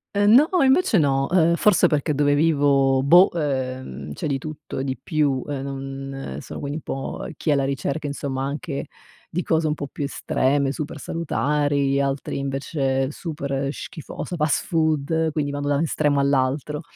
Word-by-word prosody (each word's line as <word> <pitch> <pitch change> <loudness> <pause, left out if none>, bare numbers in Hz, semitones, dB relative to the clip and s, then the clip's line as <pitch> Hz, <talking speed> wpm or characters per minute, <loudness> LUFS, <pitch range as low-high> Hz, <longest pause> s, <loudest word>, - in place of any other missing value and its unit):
Ehm, 205 +1 +4
no, 290 +6 +7 0.2
invece 265 - +4
no, 135 -2 +2
uhm, 170 -2 +4
forse 210 +1 +4
perché 150 0 0
dove 145 0 +2
vivo, 140 -4 +3
boh, 175 +7 +7
uhm 130 - -2 0.2
c'è 155 - -4
di 140 -2 0
tutto 155 +2 -8
e 130 - -1
di 130 -1 -2
più 145 -4 0
e 135 -2 -3
non 135 - -6
sono - - -8
quindi 145 +1 -4
un 160 - -8
po' 135 - -5
chi 155 - -3
è - - +5
alla 140 -1 +1
ricerca, 140 +3 -2
insomma, 140 -2 -3
anche 140 +1 -4 0.4
di 180 +2 -2
cose 160 -1 +1
un 150 - +1
po' 145 -2 -5
più 145 - -6
estreme, 140 0 0
super 145 0 -5
salutari, 145 -2 0
altri 140 0 -2
invece 135 -1 -1
super 140 -4 -3
schifosa, 175 +2 -7
fast 150 -2 0
food, 160 0 +1
quindi 145 -2 -1
vanno 145 0 -3
da 145 - +2
un 145 - 0
estremo 145 -3 +1
all'altro. 140 +2 0
145 Hz, 175 wpm, -23 LUFS, 135-155 Hz, 0.4 s, no